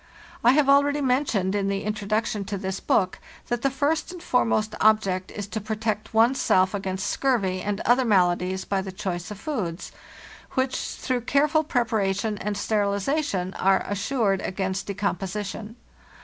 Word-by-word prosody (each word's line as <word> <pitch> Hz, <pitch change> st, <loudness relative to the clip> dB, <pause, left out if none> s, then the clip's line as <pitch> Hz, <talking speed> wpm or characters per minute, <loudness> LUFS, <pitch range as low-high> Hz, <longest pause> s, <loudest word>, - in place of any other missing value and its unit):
1 245 Hz, +3 st, +5 dB
have 295 Hz, -2 st, +4 dB
already 285 Hz, +1 st, +4 dB
mentioned, 250 Hz, -8 st, +1 dB
in 200 Hz, -1 st, 0 dB
the 195 Hz, 0 st, -1 dB
Introduction 215 Hz, 0 st, -1 dB
to 200 Hz, +1 st, -4 dB
this 190 Hz, 0 st, -3 dB
book, 185 Hz, -3 st, +1 dB, 0.3 s
that 240 Hz, -1 st, -1 dB
the 275 Hz, -, +2 dB
first 295 Hz, +5 st, 0 dB
and 355 Hz, -1 st, -9 dB
foremost 220 Hz, -3 st, +1 dB
object 195 Hz, -4 st, +3 dB
is 205 Hz, -, -5 dB
to 215 Hz, +2 st, -5 dB
protect 215 Hz, 0 st, -3 dB
one's 235 Hz, +4 st, +3 dB
self 185 Hz, +1 st, +3 dB
against 190 Hz, -1 st, -3 dB
scurvy 200 Hz, -9 st, 0 dB
and 205 Hz, +1 st, -2 dB
other 245 Hz, +3 st, +3 dB
maladies 185 Hz, -3 st, +2 dB
by 195 Hz, -1 st, 0 dB
the 190 Hz, 0 st, -6 dB
choice 185 Hz, -3 st, -4 dB
of 210 Hz, -2 st, -8 dB
foods, 205 Hz, -, -4 dB, 0.6 s
which, 260 Hz, 0 st, 0 dB
through 255 Hz, -1 st, -3 dB
careful 295 Hz, +5 st, +2 dB
preparation 220 Hz, -6 st, 0 dB
and 205 Hz, 0 st, -3 dB
sterilization, 200 Hz, 0 st, 0 dB
are 195 Hz, 0 st, +2 dB
assured 205 Hz, 0 st, 0 dB
against 190 Hz, 0 st, -3 dB
decomposition. 205 Hz, +2 st, -3 dB
210 Hz, 150 wpm, -25 LUFS, 195-245 Hz, 0.6 s, 1